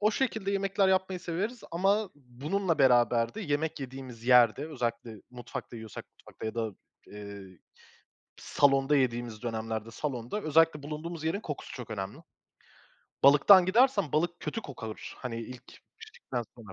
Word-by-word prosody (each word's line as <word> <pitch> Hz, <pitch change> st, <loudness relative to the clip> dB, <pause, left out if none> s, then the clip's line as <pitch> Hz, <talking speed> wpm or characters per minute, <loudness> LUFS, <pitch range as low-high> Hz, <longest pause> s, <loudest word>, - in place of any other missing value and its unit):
O 210 Hz, +1 st, +4 dB
şekilde 220 Hz, -5 st, -1 dB
yemekler 195 Hz, 0 st, +2 dB
yapmayı 190 Hz, -1 st, +1 dB
severiz 195 Hz, +8 st, -3 dB
ama 195 Hz, +3 st, +1 dB
bununla 150 Hz, +7 st, -2 dB
beraber 120 Hz, -2 st, +4 dB
de -, -, -5 dB
yemek 155 Hz, -4 st, -2 dB
yediğimiz 130 Hz, -3 st, -8 dB
yerde, 125 Hz, +2 st, +5 dB
özellikle 120 Hz, -5 st, -3 dB
mutfakta 120 Hz, -1 st, -8 dB
yiyorsak 110 Hz, -1 st, -8 dB
mutfakta -, -, -9 dB
ya 110 Hz, -, -4 dB
da, 110 Hz, -4 st, -2 dB, 0.3 s
eee, 100 Hz, -3 st, -10 dB, 0.8 s
salonda 135 Hz, 0 st, +3 dB
yediğimiz 120 Hz, -4 st, -1 dB
dönemlerde, 115 Hz, -1 st, -4 dB
salonda 130 Hz, -, -4 dB
özellikle 155 Hz, -1 st, +3 dB
bulunduğumuz 155 Hz, +2 st, -6 dB
yerin 160 Hz, +5 st, 0 dB
kokusu 150 Hz, -9 st, -7 dB
çok 125 Hz, -3 st, -8 dB
önemli. 100 Hz, +4 st, -5 dB, 1.1 s
Balıktan 175 Hz, +7 st, +8 dB
gidersen 240 Hz, -, +3 dB
balık 175 Hz, +3 st, 0 dB
kötü 225 Hz, -, -3 dB
kokar, 115 Hz, -5 st, -8 dB
hani, 125 Hz, -3 st, -5 dB
ilk 125 Hz, +2 st, -9 dB, 0.3 s
piştikten 455 Hz, +1 st, -6 dB
sonra. -, -, -11 dB
140 Hz, 135 wpm, -29 LUFS, 115-185 Hz, 1.1 s, Balıktan